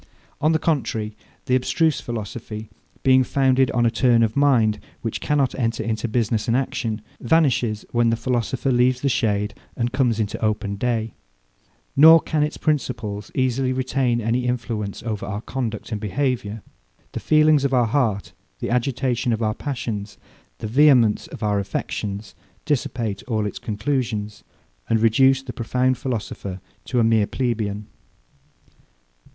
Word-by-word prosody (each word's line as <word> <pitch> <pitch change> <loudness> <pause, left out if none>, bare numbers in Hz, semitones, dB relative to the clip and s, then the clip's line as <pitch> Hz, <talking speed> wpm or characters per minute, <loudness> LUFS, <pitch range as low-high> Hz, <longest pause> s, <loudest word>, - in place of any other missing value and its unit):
On 155 - +3
the 160 - +3
contrary, 115 -9 -1 0.3
the 125 - 0
abstruse 150 +4 +2
philosophy, 110 -1 -6 0.3
being 130 0 +5
founded 130 0 +2
on 120 -1 +1
a 115 - +3
turn 120 -1 +3
of 110 -1 0
mind, 125 -7 +3 0.2
which 115 - -3
cannot 145 -4 +1
enter 115 -3 -1
into 110 +1 -2
business 110 -1 0
and 115 +1 +3
action, 115 -4 -2 0.2
vanishes 120 -6 +1
when 120 -1 +3
the 115 - +2
philosopher 125 +2 -1
leaves 125 +1 +2
the 140 - +1
shade, 105 -4 0 0.2
and 120 0 -1
comes 125 -4 +1
into 105 0 -2
open 105 -1 0
day; 115 0 -1 0.8
nor 160 +3 +9
can 155 -1 -1
its 150 +1 -1
principles 115 -9 -2
easily 130 0 +1
retain 130 -2 0
any 120 +2 0
influence 115 -5 -3
over 110 -4 -3
our 105 +1 -4
conduct 115 -3 -4
and 105 -2 -3
behaviour. 115 -2 -2 0.5
The - - -4
feelings 155 -2 +4
of 140 - +1
our 125 -2 +3
heart, 110 -5 0 0.2
the - - -4
agitation 125 0 0
of 115 0 -1
our 110 0 +1
passions, 110 -7 -5 0.4
the - - -5
vehemence 125 -3 +4
of - - -9
our 105 -1 +1
affections, 100 +1 -4 0.3
dissipate 120 -7 -1
all 110 -4 0
its 105 - -4
conclusions, 110 -2 -2 0.5
and 115 -1 +3
reduce 130 +4 +4
the 125 -2 -7
profound 125 +2 0
philosopher 105 -6 -4 0.3
to 125 - 0
a - - +4
mere 110 -2 +3
plebeian. 105 -5 -2
120 Hz, 150 wpm, -22 LUFS, 110-130 Hz, 0.8 s, nor